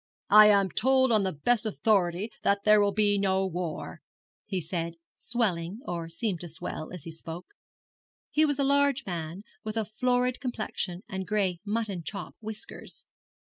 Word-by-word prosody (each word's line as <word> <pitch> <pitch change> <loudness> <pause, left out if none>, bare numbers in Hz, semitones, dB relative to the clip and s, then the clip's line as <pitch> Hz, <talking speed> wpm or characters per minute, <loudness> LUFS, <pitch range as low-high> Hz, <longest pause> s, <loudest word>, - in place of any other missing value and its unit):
'I 210 +1 +10
am 200 -3 +4
told 260 +2 +3
on 215 -2 +4
the 190 -1 0
best 220 - +1
authority 205 -2 +1
that 200 0 +2
there 210 -1 +7
will 200 0 +3
be 205 0 +3
no 190 -1 +2
war,' 175 -3 -4 0.5
he 195 -3 -1
said, 170 0 -3 0.2
swelling, 200 -5 -1
or 170 -2 -4
seeming 180 +2 -2
to 175 - -6
swell, 155 0 -5
as 180 -5 -8
he 165 - -7
spoke. 165 +2 -7 0.8
He 310 - +4
was 290 -3 +2
a 280 - +1
large 280 -1 +3
man, 170 +1 -5 0.2
with 215 +1 -4
a 220 - +1
florid 250 +3 0
complexion 215 -7 -3
and 190 -4 -5
gray 195 -5 0
mutton 210 -3 -2
chop 200 +5 -6
whiskers. 215 -1 -8
200 Hz, 165 wpm, -28 LUFS, 175-225 Hz, 0.8 s, I